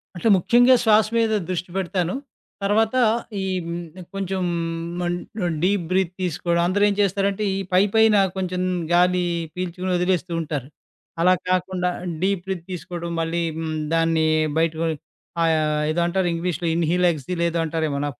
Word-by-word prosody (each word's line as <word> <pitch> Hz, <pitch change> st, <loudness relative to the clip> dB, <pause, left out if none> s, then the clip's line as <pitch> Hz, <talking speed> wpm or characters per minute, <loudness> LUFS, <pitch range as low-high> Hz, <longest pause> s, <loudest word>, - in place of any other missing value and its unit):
అంటే, 175 Hz, -, -1 dB
ముఖ్యంగా 245 Hz, +7 st, +5 dB
శ్వాస 215 Hz, -2 st, +5 dB
మీద 225 Hz, -1 st, +2 dB, 0.2 s
దృష్టి 180 Hz, -1 st, -3 dB
పెడతాను, 180 Hz, -2 st, -1 dB, 0.5 s
తర్వాత 220 Hz, +4 st, +2 dB, 0.5 s
ఈ -, -, -2 dB, 0.2 s
హ్మ్, 170 Hz, +1 st, -7 dB
కొంచెం 190 Hz, -1 st, -2 dB, 0.6 s
మం 175 Hz, -1 st, -1 dB, 0.4 s
ఆహ్, -, -, -1 dB
డీప్ 195 Hz, 0 st, +2 dB
బ్రీత్ 185 Hz, -1 st, +1 dB
తీసుకోవడం. 170 Hz, -1 st, 0 dB
అందరేం 205 Hz, +2 st, +3 dB
చేస్తారంటే 200 Hz, +1 st, 0 dB
ఈ -, -, -2 dB
పైపైన 210 Hz, +3 st, +4 dB, 0.2 s
కొంచెం 185 Hz, -1 st, -2 dB, 0.3 s
గాలి 180 Hz, +1 st, +3 dB, 0.3 s
పీల్చుకొని 180 Hz, +1 st, -3 dB
వదిలేస్తూ 180 Hz, 0 st, 0 dB
ఉంటారు. 145 Hz, -5 st, -4 dB, 0.5 s
అలా 180 Hz, +2 st, +5 dB, 0.2 s
కాకుండా 185 Hz, 0 st, 0 dB, 0.3 s
డీప్ 190 Hz, -1 st, 0 dB
బ్రీత్ 185 Hz, -3 st, -4 dB
తీసుకోవడం 170 Hz, 0 st, -5 dB
మళ్ళీ 165 Hz, +1 st, -1 dB
హ్మ్, 160 Hz, -1 st, -3 dB, 0.2 s
దాన్ని 165 Hz, -1 st, +2 dB, 0.3 s
బయటకి 165 Hz, 0 st, 0 dB, 0.6 s
ఆహ్, 155 Hz, -2 st, +1 dB
ఏదో 170 Hz, +2 st, 0 dB
అంటారు 185 Hz, +1 st, 0 dB
ఇంగ్లీష్‌లో 170 Hz, 0 st, -2 dB
ఇన్‌హేల్, 170 Hz, +2 st, +2 dB
ఎక్స్‌హేల్ 170 Hz, +3 st, -3 dB
ఏదో 170 Hz, 0 st, -2 dB
అంటారేమో 155 Hz, -3 st, -1 dB
నాకు 135 Hz, -4 st, -7 dB
180 Hz, 140 wpm, -23 LUFS, 165-190 Hz, 0.6 s, ముఖ్యంగా